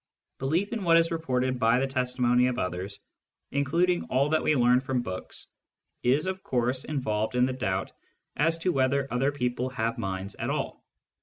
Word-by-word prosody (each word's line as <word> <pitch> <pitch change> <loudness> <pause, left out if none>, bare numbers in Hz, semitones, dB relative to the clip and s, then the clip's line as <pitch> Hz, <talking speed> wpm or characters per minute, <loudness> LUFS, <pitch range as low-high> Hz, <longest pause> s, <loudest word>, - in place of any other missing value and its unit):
Belief 165 - 0
in 225 -4 -3
what 165 -2 +5
is 165 0 +3
reported 130 -6 -1
by 115 +1 +4
the 135 - +1
testimony 125 -2 +2
of 125 -1 -1
others, 90 0 -4 0.5
including 170 +6 +1
all 135 +3 +1
that 155 0 +2
we 155 - +2
learn 125 -1 +4
from 130 -1 -2
books, 95 -4 -7 0.6
is 135 +7 +2
of 190 0 -3
course 125 -1 -1
involved 110 -6 -1
in 125 0 +4
the 130 - -1
doubt 95 -7 -2 0.4
as 165 +2 +2
to 175 +2 0
whether 135 -1 +1
other 135 +3 +2
people 125 -2 -2
have 115 -2 -2
minds 95 -1 -3
at - - -4
all. - - -3
130 Hz, 175 wpm, -27 LUFS, 120-150 Hz, 0.6 s, what